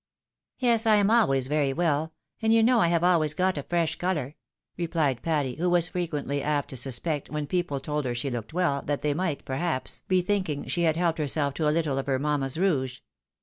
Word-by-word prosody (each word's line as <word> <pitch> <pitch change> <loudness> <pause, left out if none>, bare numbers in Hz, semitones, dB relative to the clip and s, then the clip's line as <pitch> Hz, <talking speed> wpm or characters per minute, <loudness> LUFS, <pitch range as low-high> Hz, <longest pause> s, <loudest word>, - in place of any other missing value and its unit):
" - - -65
Yes,^ 235 -3 +2
I 215 - +6
am 205 0 +3
always 135 - +3
very 145 -1 +1
well, 160 -1 0 0.3
and 220 0 +2
you 225 0 +5
know 240 +1 +4
I 175 - +4
have 170 0 +1
always 165 -4 +3
got 185 0 +1
a - - -2
fresfi 170 +2 -1
colour," 155 -6 -2 0.4
replied 160 -7 -1
Patty, 145 -6 -1
who 175 +3 0
was 175 -1 +2
frequently 150 -6 -2
apt 145 -1 -1
to - - -7
suspect, 135 +4 -2
when 150 -1 -3
people 175 -3 -1
told 150 +1 -3
her 120 -1 -2
she 130 +3 -3
looked 115 -3 -5
well, 160 -5 0
that 145 -1 -3
they 150 -1 +1
might, 160 -3 -2
perhaps, 135 0 -2
be 185 -1 +2
thinking 185 -7 -1
she 175 - -1
had 160 -1 +2
helped 170 -2 0
herself 145 -1 0
to 155 +1 -1
a - - +4
little 150 -3 0
of 135 - -5
her 135 -1 +1
mamma's 140 -1 -1
rouge. 135 -9 0
155 Hz, 220 wpm, -26 LUFS, 140-175 Hz, 0.4 s, I